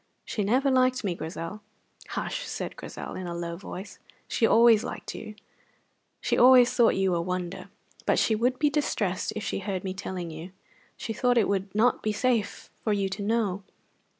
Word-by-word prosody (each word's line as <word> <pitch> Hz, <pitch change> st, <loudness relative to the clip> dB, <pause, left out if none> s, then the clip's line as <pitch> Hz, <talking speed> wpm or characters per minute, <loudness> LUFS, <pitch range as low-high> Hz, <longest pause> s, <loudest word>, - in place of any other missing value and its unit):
"She 210 Hz, -, -2 dB
never 260 Hz, +7 st, +2 dB
liked 255 Hz, -1 st, +3 dB
me, 190 Hz, -4 st, 0 dB
Grizel." 165 Hz, +5 st, -6 dB, 0.5 s
"Hush!" -, -, -3 dB
said -, -, -5 dB
Grizel, -, -, -7 dB
in 185 Hz, -, -5 dB
a 170 Hz, -, -4 dB
low 170 Hz, 0 st, -4 dB
voice. 190 Hz, +2 st, -8 dB, 0.3 s
"She 225 Hz, -, +2 dB
always 230 Hz, -1 st, +6 dB
liked -, -, -6 dB
you; 215 Hz, -, -8 dB, 0.8 s
she -, -, 0 dB
always 250 Hz, -1 st, +7 dB
thought 235 Hz, -2 st, +4 dB
you 190 Hz, -1 st, +2 dB
a 170 Hz, -, +1 dB
wonder. 180 Hz, 0 st, -4 dB, 0.4 s
But -, -, +3 dB
she 225 Hz, -, +3 dB
would 245 Hz, +4 st, +1 dB
be 295 Hz, +1 st, +2 dB
distressed 210 Hz, -10 st, -1 dB
if 215 Hz, -, -4 dB
she -, -, -2 dB
heard 190 Hz, -2 st, -3 dB
me 190 Hz, -1 st, -3 dB
telling 185 Hz, -3 st, -5 dB
you. 165 Hz, +4 st, -9 dB, 0.4 s
She 225 Hz, -, -4 dB
thought 245 Hz, +2 st, +2 dB
it 225 Hz, -, +4 dB
would 195 Hz, 0 st, -2 dB
not 235 Hz, +4 st, +3 dB
be 215 Hz, -, 0 dB
safe 230 Hz, -2 st, -1 dB
for 215 Hz, -, +1 dB
you 200 Hz, -1 st, 0 dB
to 195 Hz, +2 st, -5 dB
know. 200 Hz, -3 st, 0 dB
205 Hz, 185 wpm, -27 LUFS, 185-235 Hz, 0.8 s, always